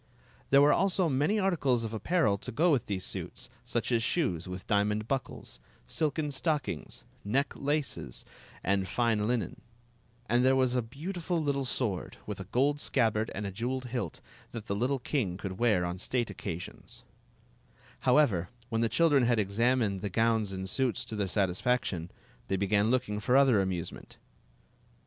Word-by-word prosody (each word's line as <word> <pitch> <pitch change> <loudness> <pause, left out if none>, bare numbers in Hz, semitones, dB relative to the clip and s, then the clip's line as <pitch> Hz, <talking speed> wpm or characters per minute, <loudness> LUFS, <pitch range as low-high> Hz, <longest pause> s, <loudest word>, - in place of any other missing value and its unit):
There 140 +1 +7
were 145 - +6
also 190 -2 +2
many 145 +10 +2
articles 150 - +1
of 115 -1 -4
apparel 110 - +2
to - - -5
go 165 +8 +3
with 135 -6 +1
these 95 -2 -2
suits, - - -5
such - - -2
as 115 -1 +3
shoes 115 - 0
with 90 0 -6
diamond 105 +1 +1
buckles, 125 - -4 0.3
silken 150 - -1
stockings, 145 0 -2 0.2
neck 135 +8 +1
lacef^ 145 - -2 0.4
and 95 0 +1
fine 110 0 +1
linen; 120 +1 -2 0.7
and 120 0 +3
there 130 +1 +5
was 130 -1 +2
a 125 - +2
beautiful 165 +8 -3
little 140 -3 0
sword, 115 -7 -2
with - - -5
a - - -6
gold 145 +4 +1
scabbard 110 -5 +1
and 105 - -3
a 100 - -3
jeweled 125 +6 -3
hilt, 120 -9 -4 0.3
that 115 -3 -6
the 100 - -2
little 125 +6 +1
king 120 - -1
could 95 -1 -6
wear 105 -7 +3
on 90 +1 -4
state 120 +1 -1
occasions 85 -2 -7 1.0
However, 125 - +3 0.2
when 115 -1 0
the 115 - +2
children 145 -5 +4
had 120 -1 +3
examined 105 0 +1
the 100 - -2
gowns 110 0 +1
and 95 0 -4
suits 125 +1 0
to 110 - -6
their 100 -2 -1
satisfaction, 95 -1 0 0.4
they 95 - 0
began 100 +2 +2
look 130 +1 +1
ing 105 0 -3
for 125 +5 +3
other 130 -7 +5
amusement. 95 -3 -4
115 Hz, 165 wpm, -30 LUFS, 100-135 Hz, 1.0 s, There